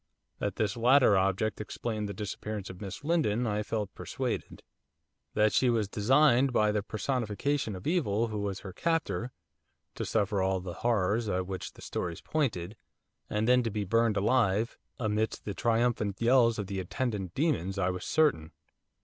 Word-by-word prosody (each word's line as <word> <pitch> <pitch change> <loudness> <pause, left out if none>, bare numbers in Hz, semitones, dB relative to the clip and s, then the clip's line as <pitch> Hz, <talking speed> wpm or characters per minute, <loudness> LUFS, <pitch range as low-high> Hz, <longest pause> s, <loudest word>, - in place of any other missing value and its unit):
That - - -2
this 105 -3 0
latter 125 -1 +5
object 95 +3 +1
explained 105 -1 -4
the - - -4
disappearance 105 0 -5
of 90 - -12
Miss 100 +7 -6
Lindon 145 -8 +1
I 105 -2 0
felt 105 -1 -3
persuaded. - - -4 0.7
That 105 0 +3
she 130 - +3
was 115 -4 +1
designed 130 +5 +4
by 105 -3 +3
the 105 0 0
personification 115 +2 -1
of 90 - -9
evil 115 - +1
who 105 -1 -3
was 100 -1 -3
her 95 -3 -8
captor, 165 - -1 0.6
to - - -4
suffer 100 -1 0
all 95 0 +1
the 90 -1 -6
horrors 110 -1 +1
at 95 -1 0
which 95 0 -5
the - - -14
stories 85 -2 -4
pointed, 110 - -1 0.5
and 105 +1 0
then 125 0 +5
to 115 - -1
be 105 -1 -2
burned 115 +1 +2
alive, 110 0 +2 0.2
amidst 110 -2 -1
the 100 - -3
triumphant 115 -2 0
yells 115 -1 +4
of 105 - -2
the 95 0 -4
attendant 95 -2 -3
demons, 100 - 0
I 95 -1 +1
was 90 0 -5
certain. 145 - +1
105 Hz, 165 wpm, -30 LUFS, 100-120 Hz, 0.7 s, latter